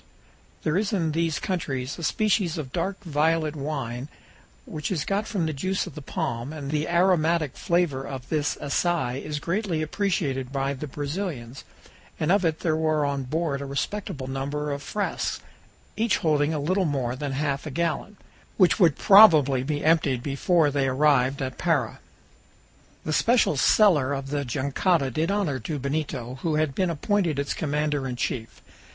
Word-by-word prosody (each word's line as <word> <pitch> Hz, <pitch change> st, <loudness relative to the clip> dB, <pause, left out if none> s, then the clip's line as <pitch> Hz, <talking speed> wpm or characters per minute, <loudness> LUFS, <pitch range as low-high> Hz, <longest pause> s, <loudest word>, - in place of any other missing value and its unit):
There 155 Hz, +4 st, +1 dB
is 210 Hz, +1 st, -1 dB
in 165 Hz, -5 st, +1 dB
these 165 Hz, -1 st, 0 dB
countries 140 Hz, -7 st, -3 dB
a -, -, -6 dB
species 200 Hz, -2 st, +1 dB
of 135 Hz, -5 st, -6 dB
dark 190 Hz, +3 st, -2 dB
violet 160 Hz, -1 st, +1 dB
wine, 135 Hz, -4 st, -4 dB, 0.6 s
which 150 Hz, -1 st, -5 dB
is 160 Hz, -6 st, -1 dB
got 200 Hz, +2 st, -1 dB
from 190 Hz, -7 st, -1 dB
the 155 Hz, -, -2 dB
juice 185 Hz, +7 st, -1 dB
of -, -, -9 dB
the 150 Hz, -, -8 dB
palm, 120 Hz, -1 st, -3 dB
and 145 Hz, -3 st, -6 dB
the 150 Hz, +1 st, -1 dB
aromatic 170 Hz, -4 st, +2 dB
flavor 170 Hz, -6 st, 0 dB
of 135 Hz, -2 st, -7 dB
this 150 Hz, -2 st, 0 dB
"assais" 145 Hz, -3 st, -1 dB
is 150 Hz, -1 st, -4 dB
greatly 170 Hz, 0 st, -1 dB
appreciated 150 Hz, -7 st, -1 dB
by 135 Hz, 0 st, -1 dB
the 140 Hz, +3 st, -6 dB
Brazilans, 145 Hz, -4 st, -5 dB, 0.6 s
and 155 Hz, +2 st, +1 dB
of 200 Hz, 0 st, +3 dB
it 160 Hz, -2 st, 0 dB
there 160 Hz, -2 st, +1 dB
were 155 Hz, -2 st, +1 dB
on 140 Hz, -2 st, -2 dB
board 150 Hz, 0 st, -1 dB
a -, -, -4 dB
respectable 140 Hz, +1 st, -3 dB
number 140 Hz, +3 st, -3 dB
of 140 Hz, 0 st, -3 dB
frasques 205 Hz, +6 st, -2 dB, 0.6 s
(each 225 Hz, -1 st, +1 dB
holding 150 Hz, -2 st, +1 dB
a 160 Hz, -, -1 dB
little 185 Hz, +6 st, +1 dB
more 130 Hz, -5 st, -1 dB
than 140 Hz, 0 st, -4 dB
half 140 Hz, +1 st, -2 dB
a -, -, -3 dB
gallon), 170 Hz, +7 st, -2 dB, 0.4 s
which 185 Hz, +2 st, +4 dB
would 170 Hz, -7 st, +4 dB
probably 155 Hz, -11 st, +7 dB
be 145 Hz, +3 st, -2 dB
emptied 145 Hz, -6 st, +2 dB
before 150 Hz, +2 st, +2 dB
they 140 Hz, -1 st, +1 dB
arrived 135 Hz, 0 st, +2 dB
at 130 Hz, -1 st, -5 dB
Para. -, -, 0 dB, 1.1 s
The 155 Hz, -, -1 dB
special 235 Hz, -3 st, +3 dB
cellar 145 Hz, -3 st, +4 dB
of 135 Hz, 0 st, -4 dB
the 145 Hz, -1 st, -1 dB
jangada 140 Hz, +3 st, 0 dB
did 155 Hz, +6 st, -1 dB
honor 195 Hz, -10 st, 0 dB
to 145 Hz, +6 st, -4 dB
Benito, 140 Hz, -3 st, -3 dB
who 160 Hz, -2 st, 0 dB
had 155 Hz, -2 st, +1 dB
been 185 Hz, +4 st, 0 dB
appointed 170 Hz, -1 st, 0 dB
its 140 Hz, 0 st, -1 dB
commander 150 Hz, -2 st, -1 dB
in 125 Hz, -, -4 dB
chief. 120 Hz, -2 st, -4 dB
150 Hz, 170 wpm, -25 LUFS, 135-170 Hz, 1.1 s, probably